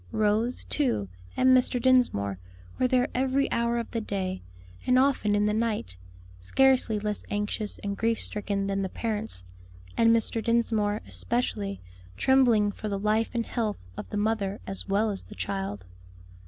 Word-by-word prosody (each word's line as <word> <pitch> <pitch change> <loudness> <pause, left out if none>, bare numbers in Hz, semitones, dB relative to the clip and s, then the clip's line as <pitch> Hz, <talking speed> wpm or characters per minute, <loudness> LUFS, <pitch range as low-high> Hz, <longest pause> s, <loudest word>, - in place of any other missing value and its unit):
Rose, 215 +3 +1
too, 240 - 0 0.3
and 255 0 +6
Mr. 250 0 +2
Dinsmore, 235 - +2 0.4
were 255 - +3
there 250 0 +2
every 265 +2 +1
hour 235 0 +1
of 235 - -4
the 230 - -2
day, 190 -3 -3 0.5
and 250 0 +5
often 255 -6 +3
in 205 0 +2
the 210 - +1
night, 215 - -1 0.4
scarcely 250 - +3
less 210 0 -2
anxious 210 +1 -2
and 200 -1 -2
grief 225 +2 0
stricken 200 -1 -1
than 195 0 -1
the 190 - -2
parents, 215 - -4 0.5
and 230 - +4
Mr. 230 0 +2
Dinsmore 220 -3 +1
especially, 210 -5 -2 0.4
trembling 240 -6 +4
for 215 +1 -6
the 200 - -1
life 215 +4 0
and 230 -1 0
health 220 -4 -2 0.2
of - - -7
the 210 - -3
mother 205 -1 0
as 195 0 -4
well 210 +2 +2
as 195 - -4
the 210 - -12
child. 195 - -4
215 Hz, 160 wpm, -27 LUFS, 200-235 Hz, 0.5 s, and